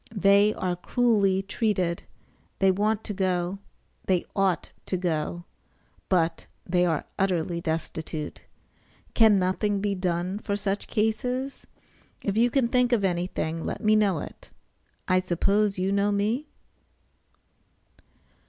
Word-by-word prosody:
They 200 +1 +5
are 180 -1 -1
cruelly 200 -1 +2
treated; 190 -4 -1 0.6
they 195 0 +4
want 210 +3 0
to 210 - -4
go, 185 0 -1 0.5
they 185 -2 +2
ought 195 -3 +1 0.2
to 185 - 0
go; 175 0 -2 0.6
but 170 -3 +1 0.2
they 180 0 +2
are 160 -3 -1
utterly 175 -3 0
destitute. 160 -1 -4 0.7
Can 220 -3 +6
nothing 195 +2 0
be 200 0 0
done 180 +1 -2
for 200 -1 -2
such 200 0 -1
cases? 250 +5 -1 0.6
If 200 - -1
you 235 +2 +4
can 255 -1 +2
think 250 +1 +2
of 230 -4 +2
anything 175 -3 -1
let - - -4
me 215 0 +5
know 205 -5 +3
it. - - -8 0.6
I 185 0 +4
suppose 195 +3 +1
you 185 +1 0
know 200 +1 +2
me? 215 +8 0
195 Hz, 125 wpm, -26 LUFS, 180-210 Hz, 0.7 s, Can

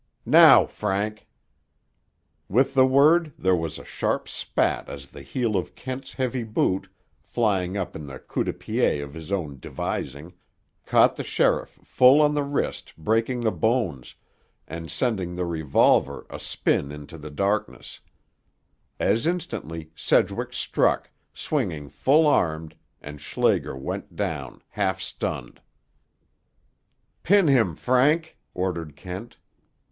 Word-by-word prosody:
Now, - - +8
Frank!" 105 +1 -3 1.2
With 130 +7 +2
the 130 -1 +5
word 150 +4 +4
there 95 0 +2
was 80 -2 -3
a - - -11
sharp - - -2
spat - - -1
as 70 -1 -9
the - - -11
heel 120 -5 -2
of 90 - -2
Kent's 130 +1 -7
heavy 130 -1 -2
boot, 95 -3 0 0.3
flying 100 -5 0
up 90 -3 -4
in 75 -2 -7
the 65 -1 -8
coup - - -3
de - - -1
pied 70 - 0
of 70 0 -8
his 80 +2 -9
own 75 -9 -3
devising, 70 +5 -5 0.5
caught - - +4
the - - -3
sheriff - - 0
full 130 +3 +5
on 150 -1 +4
the 145 - +1
wrist 140 0 -3
breaking 115 +8 0
the 110 -2 +1
bones, 110 - -1 0.5
and 80 0 -7
sending 95 -8 -1
the 90 0 -2
revolver 75 -4 +2
a - - -7
spin 70 - -1
into 75 +3 -10
the 75 +1 -8
darkness. 100 +7 -2 1.0
As 115 +7 +1
instantly 80 - -4
Sedgwick - - +1
struck, - - 0 0.2
swinging 85 - -3
full 150 +4 +3
armed, 80 - +1 0.3
and 75 0 -9
Schlager 70 - 0
went 65 - -6
down, - - -4
half 100 -2 -1
stunned. - - -5 1.6
"Pin 195 -1 +4
him, 115 - +3
Frank," 145 - +2 0.2
ordered 85 -5 -3
Kent. 95 +9 -8
95 Hz, 130 wpm, -25 LUFS, 80-130 Hz, 1.6 s, Now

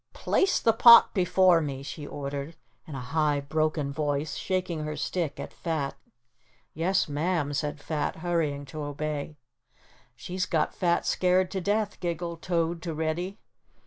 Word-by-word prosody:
"Place 385 0 +1
the 225 - +3
pot 235 +1 +8
before 180 -2 +4
me," 135 -3 -4
she 145 +1 -7
ordered, 140 +2 -5 0.3
in 150 - -7
a - - -4
high, 150 +2 +1
broken 150 0 -1
voice, 145 +1 -1
shaking 185 -3 -2
her 150 0 -4
stick 170 -6 -2
at - - -7
Fat. 155 -5 -2 0.8
"Yes, 180 +5 +1
Ma'am," 150 0 -1
said 145 +2 -2
Fat, 150 0 -2
hurrying 160 -4 -1
to 150 +3 -7
obey. 150 +1 -4 0.8
"She's 180 +10 -3
got 155 -2 0
Fat 170 -1 +1
scared 185 0 +2
to 190 - -2
death," 205 +2 -1
giggled 170 -1 -4
Toad 170 -1 -1
to 165 -2 -4
Reddy. 165 +5 -2
160 Hz, 145 wpm, -27 LUFS, 145-180 Hz, 0.8 s, pot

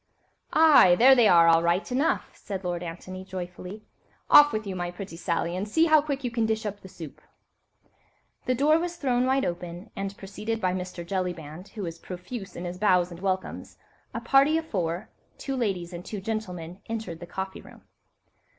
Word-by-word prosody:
"Aye! 300 - +7
there 255 +7 +7
they 240 -4 +5
are, 170 -3 +6
all 165 0 +6
right 170 +7 0
enough," 275 +6 0
said 195 -2 -7
Lord 175 -1 -2
Antony, 185 +2 -7
joyfully; 185 +2 -7 0.5
"off 295 0 +9
with 215 0 -3
you, 195 -2 -4
my 175 -1 -3
pretty 180 0 -8
Sally, 170 0 -2
and 200 +3 -3
see 320 +9 +4
how 310 -2 +5
quickly 280 -3 -3
you - - -4
can 230 -2 +1
dish 220 0 -1
up 205 -1 -4
the - - -11
soup." 165 -5 -10 1.3
The 255 - +2
door 300 +5 +4
was 350 0 -3
thrown 255 -5 +1
wide 265 +1 +2
open, 175 +3 -5
and, 195 0 -4
preceded 210 +3 -4
by 185 -4 0
Mr. 180 -2 -5
Jellyband, 175 -2 -4
who 210 - -4
was 165 -1 -6
profuse 185 +4 -8
in 175 - -6
his 175 +1 -6
bows 180 -3 +3
and 170 - -9
welcomes, 190 0 -3 0.3
a - - -4
party 275 +6 +4
of 325 - -3
four—two 190 - -5
ladies 190 -8 -2
and 175 0 -7
two 210 - -6
gentlemen—entered 190 -1 -5
the 175 - -9
coffee 190 +1 -5
room. - - -16
190 Hz, 185 wpm, -26 LUFS, 175-235 Hz, 1.3 s, off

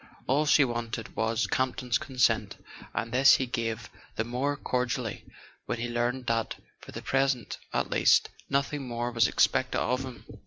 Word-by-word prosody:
All 145 +4 +2
she 145 -1 +6
wanted 115 -2 -4
was 110 +1 +1
Camp 130 -1 0
ton's 125 -2 0
consent; 130 -2 +1 0.3
and 115 - -3
this 135 +3 +7
he 130 - 0
gave 115 -2 -3 0.3
the 110 - 0
more 130 +5 -1
cordially 125 -3 -2 0.4
when 120 - -2
he 120 +1 -3
learned 120 +2 -1
that, 115 -1 0 0.2
for - - -12
the - - -7
present 135 -4 0
at - - -1
least, - - +4 0.2
nothing 140 0 -1
more 120 0 -2
was 115 -3 +4
expected - - +2
of 125 +2 0
him. 130 -4 -9
125 Hz, 165 wpm, -28 LUFS, 115-135 Hz, 0.4 s, this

